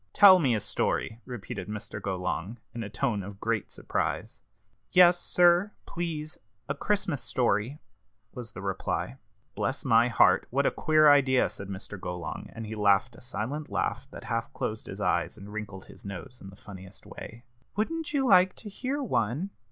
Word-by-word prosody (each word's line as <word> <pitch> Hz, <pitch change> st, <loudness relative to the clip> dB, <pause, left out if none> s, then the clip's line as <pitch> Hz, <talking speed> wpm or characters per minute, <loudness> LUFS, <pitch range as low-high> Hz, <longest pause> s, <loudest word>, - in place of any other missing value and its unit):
"Tell 190 Hz, -2 st, +9 dB
me 130 Hz, -8 st, +2 dB
a -, -, 0 dB
story!" 110 Hz, +3 st, -2 dB
repeated 120 Hz, -6 st, -6 dB
Mr. 105 Hz, -1 st, -6 dB
Golong, 95 Hz, +2 st, -3 dB, 0.2 s
in 115 Hz, -, -5 dB
a 105 Hz, -, -5 dB
tone 105 Hz, 0 st, -1 dB
of 100 Hz, +1 st, -9 dB
great 115 Hz, -2 st, -1 dB
surprise. -, -, -3 dB, 0.5 s
"Yes, 175 Hz, -1 st, +7 dB
sir, 175 Hz, +4 st, +4 dB
please 160 Hz, -3 st, -4 dB, 0.3 s
a 140 Hz, -, 0 dB
Christmas 170 Hz, -, -1 dB
story," 120 Hz, +1 st, 0 dB, 0.6 s
was 120 Hz, -3 st, -7 dB
the 95 Hz, -, -8 dB
reply. 100 Hz, +6 st, -2 dB, 0.4 s
"Bless 135 Hz, +3 st, -2 dB
my 115 Hz, -1 st, +5 dB
heart! 120 Hz, -, +4 dB
what -, -, +1 dB
a -, -, +3 dB
queer 155 Hz, -1 st, +4 dB
idea!" 130 Hz, -3 st, +4 dB
said 100 Hz, -, -8 dB
Mr. 100 Hz, +1 st, -7 dB
Golong, 90 Hz, -1 st, -5 dB
and 115 Hz, -, -5 dB
he 110 Hz, -, -6 dB
laughed 105 Hz, +2 st, +3 dB
a -, -, -14 dB
silent 130 Hz, +5 st, -4 dB
laugh 130 Hz, +2 st, -2 dB
that -, -, -10 dB
half 115 Hz, 0 st, -2 dB
closed 110 Hz, 0 st, -4 dB
his 95 Hz, -, -7 dB
eyes 85 Hz, -2 st, 0 dB
and 100 Hz, 0 st, -10 dB
wrinkled 100 Hz, -3 st, -6 dB
his -, -, -14 dB
nose 100 Hz, +4 st, -8 dB
in 95 Hz, -, -9 dB
the 95 Hz, -, -13 dB
funniest 95 Hz, -1 st, -11 dB
way. 115 Hz, +1 st, -10 dB, 0.3 s
"Wouldn't 320 Hz, +10 st, -2 dB
you 280 Hz, -3 st, +1 dB
like 185 Hz, -5 st, +5 dB
to 215 Hz, -, -9 dB
hear 265 Hz, +8 st, -3 dB
one?" 145 Hz, -, -1 dB
115 Hz, 175 wpm, -28 LUFS, 100-155 Hz, 0.6 s, Tell